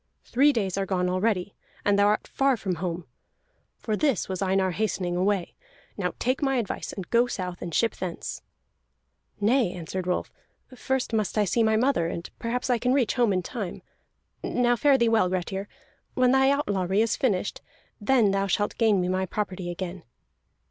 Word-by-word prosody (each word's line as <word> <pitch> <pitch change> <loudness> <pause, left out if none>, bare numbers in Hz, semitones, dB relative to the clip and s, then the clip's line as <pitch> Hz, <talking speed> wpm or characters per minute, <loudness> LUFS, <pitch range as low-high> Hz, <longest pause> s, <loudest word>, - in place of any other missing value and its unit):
Three 280 +4 +4
days 200 -7 -1
are 195 - 0
gone 180 -1 0
already, 190 0 0 0.3
and 200 0 +3
thou 200 - +5
art 210 +1 +1
far 270 -2 +1
from 185 -5 -3
home. 175 -2 -3 0.7
For 215 - -2
this 270 - +1
was 190 0 -4
Einar 190 -1 +2
hastening 180 -3 -1
away. 190 0 0 0.4
Now 180 -3 -2
take 255 +4 0
my 270 -2 +1
advice, 235 -6 -2
and 190 -3 -7
go 240 +1 +4
south, 180 -6 -5
and 175 - -5
ship 230 +7 +1
thence." 180 -3 -5 1.0
"Nay," 225 -1 +3
answered 180 +1 -5
Rolf, 180 - -1 0.4
"first 265 -1 -2
I - - +3
must 215 0 -2
see 230 - +2
my 220 -1 +3
mother, 235 -7 +2
and 170 +1 -5
perhaps 245 +3 -2
I 245 -2 +2
can 250 +2 +1
reach 265 -5 +2
home 240 -4 +2
in 185 -1 0
time. 205 -3 -5 0.6
Now 245 -1 +2
fare 275 +3 +4
thee 235 -2 +3
well, 225 -5 +3
Grettir. 190 +2 -3 0.5
When 255 -1 +4
thy 265 0 +4
outlawry 200 -8 +1
is 225 - 0
finished, 205 -7 -1 0.4
then 225 -2 +3
thou 195 0 0
shalt 205 +2 -1
gain 215 -5 +4
me 180 - -1
my 185 +1 0
property 190 -3 -3
again." 180 +1 -5
205 Hz, 180 wpm, -26 LUFS, 185-240 Hz, 1.0 s, thou